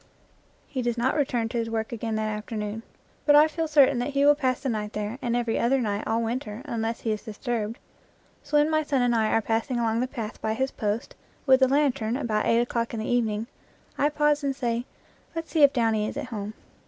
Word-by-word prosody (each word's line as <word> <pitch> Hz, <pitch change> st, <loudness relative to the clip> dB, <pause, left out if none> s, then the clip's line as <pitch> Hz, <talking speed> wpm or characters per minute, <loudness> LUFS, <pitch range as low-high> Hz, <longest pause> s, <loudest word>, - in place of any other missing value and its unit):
He 260 Hz, -, -3 dB
does 240 Hz, -1 st, -1 dB
not 250 Hz, +3 st, +1 dB
return 245 Hz, -6 st, 0 dB
to 235 Hz, -, -2 dB
his 225 Hz, 0 st, -2 dB
work 220 Hz, -1 st, -2 dB
again 225 Hz, -1 st, -3 dB
that 215 Hz, 0 st, -1 dB
after 215 Hz, +1 st, -4 dB
noon. 210 Hz, +1 st, -3 dB, 0.4 s
But 290 Hz, -, +5 dB
I 300 Hz, +1 st, +8 dB
feel 325 Hz, +1 st, -2 dB
certain 280 Hz, -4 st, +5 dB
that 245 Hz, -, -1 dB
he 280 Hz, 0 st, +3 dB
will 290 Hz, -, +8 dB
pass 260 Hz, -4 st, 0 dB
the -, -, -4 dB
night 210 Hz, -2 st, -3 dB
there 210 Hz, +4 st, -4 dB
and 235 Hz, -1 st, -1 dB
every 235 Hz, -2 st, 0 dB
night 235 Hz, -5 st, +1 dB
all 230 Hz, +1 st, +1 dB
winter 230 Hz, 0 st, -4 dB
unless 230 Hz, -4 st, -3 dB
he 225 Hz, -, -1 dB
is 215 Hz, -, -2 dB
dis 215 Hz, -1 st, -9 dB
turbed. 230 Hz, -3 st, -2 dB, 0.6 s
So 295 Hz, +1 st, 0 dB
when 295 Hz, +2 st, +3 dB
my 310 Hz, 0 st, +3 dB
son 280 Hz, -4 st, 0 dB
and 245 Hz, -1 st, +2 dB
I 220 Hz, -2 st, +2 dB
are 225 Hz, -, +1 dB
passing 230 Hz, +4 st, -1 dB
along 230 Hz, -1 st, +1 dB
the 250 Hz, -, 0 dB
path 225 Hz, -5 st, -6 dB
by 220 Hz, 0 st, -1 dB
his 265 Hz, +2 st, -1 dB
post 210 Hz, +1 st, -3 dB, 0.3 s
with 265 Hz, -1 st, +5 dB
a 260 Hz, -, +6 dB
lantern 260 Hz, -4 st, +1 dB
about 220 Hz, -6 st, -1 dB
eight 230 Hz, +1 st, +4 dB
o'clock 235 Hz, -1 st, -2 dB
in -, -, -3 dB
the 220 Hz, -, -3 dB
evening, 225 Hz, -3 st, 0 dB, 0.5 s
I 290 Hz, -, +2 dB
pause 295 Hz, 0 st, +1 dB
and 275 Hz, -1 st, 0 dB
say, 240 Hz, -2 st, -1 dB, 0.5 s
"Let's 330 Hz, 0 st, -5 dB
see 320 Hz, -, +2 dB
if 285 Hz, -1 st, +8 dB
Downy 225 Hz, -4 st, +1 dB
is -, -, -5 dB
at -, -, -3 dB
home." 210 Hz, -1 st, -5 dB
235 Hz, 235 wpm, -26 LUFS, 220-270 Hz, 0.6 s, I